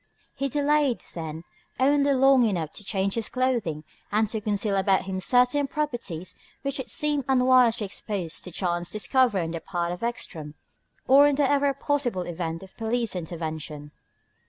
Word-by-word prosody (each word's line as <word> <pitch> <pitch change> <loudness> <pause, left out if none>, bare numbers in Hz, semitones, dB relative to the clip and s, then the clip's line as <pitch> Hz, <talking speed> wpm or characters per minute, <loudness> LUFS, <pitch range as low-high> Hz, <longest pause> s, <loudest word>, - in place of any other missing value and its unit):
He 275 0 -2
delayed, 290 -2 +1
then, 160 -1 -6 0.4
only 280 +1 +3
long 270 -1 +5
enough 170 -8 -1
to - - -7
change 195 -1 -1
his 230 -2 -2
clothing 235 -12 -1 0.3
and 215 +1 +2
to 220 -1 -3
conceal 205 -1 0
about 195 0 +2
him 190 -1 -3
certain 250 +6 +3
properties 240 - -4 0.3
which 275 0 -2
it 260 - -4
seemed 295 -2 +2
unwise 255 -2 +5
to 220 - -3
expose 190 -4 -4
to - - -8
chance 175 -1 -2
discovery 220 -1 +2
on 165 - -4
the 165 - -4
part 175 -2 -2
of 180 - -6
Ekstrom 165 -11 -4 0.5
or 280 +2 +7
in 290 - +2
the 285 -1 +2
ever 285 0 +2
possible 275 -9 -1
event 165 0 -4
of 190 - -15
police 230 -2 -1
intervention. 155 -3 -5
220 Hz, 165 wpm, -26 LUFS, 175-265 Hz, 0.5 s, or